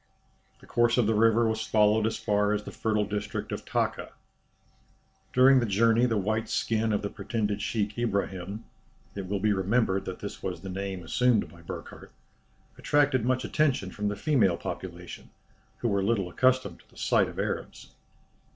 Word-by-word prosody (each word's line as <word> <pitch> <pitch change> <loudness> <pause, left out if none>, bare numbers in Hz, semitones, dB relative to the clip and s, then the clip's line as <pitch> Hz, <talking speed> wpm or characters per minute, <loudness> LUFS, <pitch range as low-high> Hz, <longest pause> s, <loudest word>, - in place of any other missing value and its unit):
The - - -15
course 120 +1 +2
of 120 - +4
the 110 - +2
river 115 +1 +4
was 110 0 -1
followed 110 0 +3
as 110 - -2
far 105 0 +1
as 105 0 -2
the - - -8
fertile 110 -2 0
district 105 0 -4
of - - -5
Taka. - - -2 1.2
During 130 +1 +6
the 120 - 0
journey 115 +4 +3
the 115 -3 0
white 110 +3 -1
skin 110 0 0
of 105 - 0
the 100 - -2
pretended 105 0 -2
sheik 105 -2 -2
Ibrahim 100 -2 -2 0.5
(it 100 -2 -6
will 100 0 -1
be 105 +1 +2
remembered 95 0 +1
that 95 - -5
this - - -7
was 80 - -4
the 95 - -7
name 95 -1 -4
assumed 120 +3 +2
by 85 +2 -15
Burckhardt) 85 - -9 0.7
attracted 145 -5 +2
much 130 0 0
attention 135 -11 0
from 105 +2 -3
the 105 - -1
female 110 - +2
population, - - -7 0.5
who 120 - -2
were 100 -3 +1
little 100 -3 0
accustomed 130 -3 +1
to - - -24
the - - -21
sight - - +2
of - - -11
Arabs. - - -4
105 Hz, 175 wpm, -28 LUFS, 100-115 Hz, 1.2 s, During